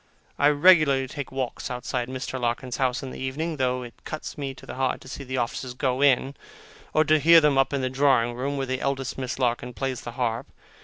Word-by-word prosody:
I 145 - +5
regularly 150 -3 +5
take 140 +1 -6
walks 130 -2 -4
outside 125 0 -3
Mr. 130 0 -5
Larkins's 120 +1 -2
house 130 0 0
in 130 - -6
the - - -8
evening, 150 +5 -3
though 125 -1 0
it 120 - -9
cuts 155 - -6
me 140 -3 -5
to - - -14
the - - -7
heart 130 0 -1
to - - -13
see 135 +1 -7
the 130 0 -4
officers 125 +1 -3
go 130 0 0
in, 135 -1 +3 0.6
or 155 - +4
to 155 0 +3
hear 165 +3 +8
them 150 -3 +3
up 135 - +2
in 140 -1 -1
the 130 - 0
drawing 130 -3 +3
room, 135 +4 -3
where 135 - -1
the 130 0 -3
eldest 135 -1 -2
Miss 130 -1 -3
Larkins 125 -1 -1
plays 135 -2 -3
the 120 - -7
harp. 120 +1 -2
130 Hz, 225 wpm, -25 LUFS, 125-140 Hz, 0.6 s, hear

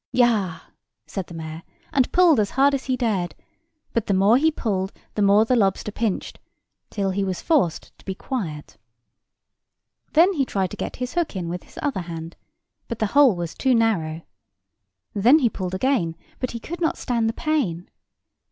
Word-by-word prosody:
"Yah!" 220 -9 +2 0.4
said 190 -3 -5
the - - -11
mayor, 160 0 -6 0.3
and 265 -2 +2
pulled 350 -7 +5
as 205 -2 +1
hard 280 +1 +5
as 270 -1 -2
he 255 -1 0
dared: 200 -8 -1 0.6
but 230 - 0
the 200 - +2
more 200 +4 +5
he 310 +5 +4
pulled, 195 -10 -2 0.2
the 210 - -1
more 205 +2 +5
the 255 - +2
lobster 200 -1 +1
pinched, 215 -2 -2 0.5
till 195 -2 -1
he 195 +1 -1
was 190 -2 -2
forced 280 - 0
to - - -19
be 190 - -3
quiet. 175 - -5 1.4
Then 345 +5 +5
he 290 -6 +1
tried 190 -7 -1
to - - -5
get - - -5
his 250 0 -4
hook 345 -9 -1
in 175 -3 -3
with 175 +1 -5
his - - -19
other 280 -10 -1
hand; 165 -1 -7 0.5
but 235 - -4
the 220 - +1
hole 280 -7 +6
was 170 -2 -4
too 260 -2 +2
narrow. 170 -8 +1 0.9
Then 235 +9 +6
he 255 -7 +3
pulled 185 -1 -4
again; 185 -7 +1 0.2
but 255 - -2
he 235 - -5
could 345 +8 -7
not 325 - +1
stand 230 -3 0
the - - -2
pain. 225 - -1
215 Hz, 185 wpm, -23 LUFS, 185-260 Hz, 1.4 s, hole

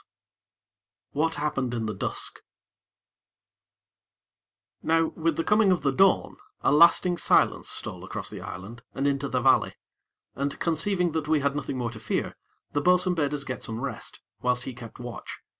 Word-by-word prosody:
IX - - -33 1.0
What 160 +3 0
Happened 135 -5 -1
in 115 -1 -2
the 110 - -2
Dusk - - -2 2.4
Now 165 0 +2
with 165 -1 -1
the 165 - -1
coming 210 0 +4
of 175 -6 +1
the 140 - +3
dawn, 190 +8 +3 0.2
a - - +2
lasting 170 +3 +5
silence - - +3
stole - - -2
across - - -5
the - - -7
island 105 +7 -8
and 135 - -1
into 140 0 +1
the 130 -2 -1
valley, - - +3 0.6
and, 140 +1 -3
conceiving 175 +2 +1
that 155 -1 -2
we 155 -1 +2
had 140 +1 0
nothing 140 -2 -3
more 120 -2 -2
to 110 - -9
fear, - - -2 0.4
the 145 - 0
bo'sun 180 +2 +4
bade 150 -4 0
us 140 - -3
get 130 -2 -6
some 110 0 -4
rest, 140 - -6 0.2
whilst 125 -1 +1
he 130 - -6
kept 115 -2 -11
watch. 120 -1 -7
145 Hz, 170 wpm, -26 LUFS, 125-165 Hz, 2.4 s, lasting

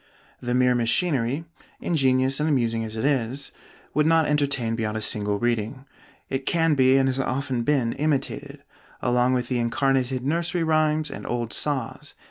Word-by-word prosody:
The 120 0 -2
mere 125 0 +4
machinery, 130 +3 +1 0.3
ingenious 135 -4 +1
and 150 +1 +1
amusing 115 -5 +1
as 110 0 -6
it 110 - -2
is, 135 -1 -1 0.4
would 150 +1 +2
not 165 -1 +4
entertain 140 -6 0
beyond 110 -1 -2
a - - -2
single 105 -1 0
reading; 120 +3 -2 0.4
it 135 0 -4
can 165 -2 +2
be 130 -1 +4
and 135 0 +3
has 130 0 -1
often 130 -1 -1
been 125 -3 +1
imitated, 145 -1 -2 0.4
along 125 +1 +2
with 125 -1 -1
the 125 -1 -1
incarnated 130 +1 0
nursery 170 +3 0
rhymes 155 -1 +1
and - - -7
old 120 -1 -3
saws. 135 -6 -3
130 Hz, 160 wpm, -24 LUFS, 120-145 Hz, 0.4 s, mere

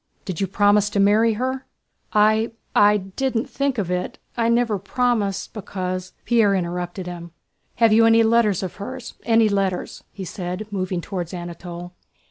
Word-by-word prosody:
"Did 185 -2 -4
you 195 - +1
promise 205 +1 +3
to 205 - -1
marry 215 +3 +4
her?" 260 +4 -3 0.4
"I... 215 +2 +3 0.2
I 205 0 +6
didn't 225 +5 -2
think 275 -2 -1
of 190 -4 -1
it. 180 0 -2 0.2
I 230 -1 +1
never 235 -3 +2
promised, 205 -2 -1
because..." 185 -3 -4
Pierre 220 -4 +4
interrupted 175 0 -3
him. 170 -1 -8 0.4
"Have 230 -2 +4
you 225 +1 +6
any 225 0 +6
letters 220 -4 +3
of 185 - -5
hers? 250 +4 -7
Any 225 -1 +4
letters?" 195 -3 -1
he 195 - -7
said, 180 +3 -5
moving 185 -2 -2
toward 175 -2 -5
Anatole. 175 0 -7
205 Hz, 155 wpm, -22 LUFS, 185-225 Hz, 0.4 s, I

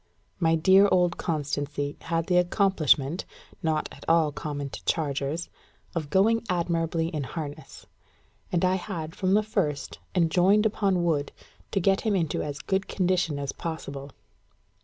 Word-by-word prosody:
My 165 -2 +3
dear 190 +5 +6
old 175 -1 +3
Constancy 145 -2 -2
had 165 0 -1
the 180 0 +2
accomplishment, 175 -5 +2 0.4
not 160 -3 0
at - - -12
all 165 -2 +4
common 145 -2 -5
to - - -8
chargers, 145 +1 -1 0.5
of 155 -4 -3
going 220 +7 +3
admirably 165 -2 0
in 155 -4 -3
harness; 150 +2 -7 0.7
and 180 -1 +2
I 185 +1 +2
had 165 -4 -5
from 190 0 +2
the 215 - +3
first 150 -9 -2 0.2
enjoined 180 +5 +4
upon 195 -4 +1
Wood 150 -4 0 0.4
to 195 - 0
get 195 +1 +2
him 215 -3 +1
into 165 -5 0
as 145 -1 -4
good 190 +5 -1
condition 180 -5 0
as 140 -1 -3
possible. 140 -4 -6
165 Hz, 145 wpm, -27 LUFS, 150-185 Hz, 0.7 s, dear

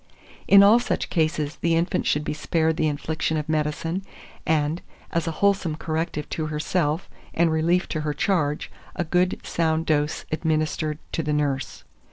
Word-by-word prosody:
In 200 0 +8
all 215 +4 +7
such 240 - -2
cases 155 -2 0
the 170 -1 +1
infant 170 +2 0
should 150 - +1
be - - -2
spared 160 +1 0
the 155 - +1
infliction 155 +2 -1
of 150 - -3
medicine, 155 +3 -1 0.5
and, 155 +1 +1 0.3
as 170 -1 -1
a - - 0
wholesome 190 -6 +2
corrective 160 -1 -3
to 155 -1 -2
herself, 150 +2 -1 0.3
and 165 0 +3
relief 170 +3 +2
to 155 - -2
her 150 -1 -2
charge, 150 -7 0 0.2
a 175 - 0
good 180 +2 +1
sound 160 -1 0
dose 150 0 0
administered 155 -1 0
to - - -1
the 150 -1 -1
nurse. 145 -2 -1
160 Hz, 165 wpm, -24 LUFS, 150-170 Hz, 0.5 s, In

